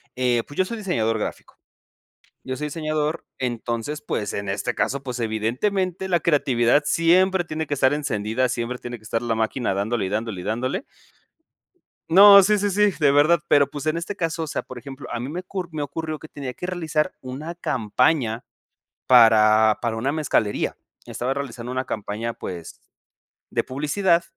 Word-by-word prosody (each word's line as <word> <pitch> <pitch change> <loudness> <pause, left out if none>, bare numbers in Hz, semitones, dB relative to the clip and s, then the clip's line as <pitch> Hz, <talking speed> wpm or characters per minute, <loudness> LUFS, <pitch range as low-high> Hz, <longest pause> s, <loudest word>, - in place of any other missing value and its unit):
Eh, 125 -2 +1
pues, 145 - -12
yo 185 - +3
soy 230 +5 -5
diseñador 115 - 0
gráfico. - - -6 0.9
Yo 130 0 -4
soy 150 +2 -3
diseñador, 155 0 -2
entonces, 120 +3 -3
pues, 105 -8 -3
en 100 -1 -4
este 105 +5 -2
caso, 140 +1 -1
pues, 125 -2 -5
evidentemente 175 - -1
la 175 -2 +3
creatividad 140 -4 +2
siempre 180 +3 +3
tiene 160 -1 -4
que 145 - -2
estar 130 -1 +3
encendida, 125 -4 -1
siempre 120 0 -3
tiene 120 0 -6
que 110 - -23
estar 115 +1 -2
la 120 -1 -1
máquina 110 0 -1
dándole, 105 +3 -1
y - - -3
dándole, 105 -2 -3
y - - -9
dándole 130 - -2 1.3
no, 200 +3 +9
sí, 210 +2 +3
sí, 205 0 0
sí, 205 +1 +3
de 145 -2 +4
verdad. 150 +4 +4
Pero 140 -2 +5
pues, 145 0 -7
en 155 +1 0
este 170 +4 -4
caso, 165 -1 -2
o - - -5
sea, - - -2
por 130 - -11
ejemplo, 135 +2 -9
a 120 - -3
mí 120 - -4
me 175 +4 -4
ocur 185 -1 -5
me 155 - -3
ocurrió 155 +2 -4
que 155 - -12
tenía 135 -3 -6
que 180 - -7
realizar 165 -2 -1
una 140 +6 -6
campaña, 125 -3 0 0.6
para 110 -3 +6
para 115 -1 -1
una 135 +5 -1
mezcalería. 145 -9 0 0.3
Estaba 125 +2 -2
realizando 125 -3 -5
una 130 0 -1
campaña, 110 0 -4
pues, 85 -6 -8 0.7
de - - 0
publicidad, 170 +6 +1
135 Hz, 175 wpm, -23 LUFS, 115-165 Hz, 1.3 s, no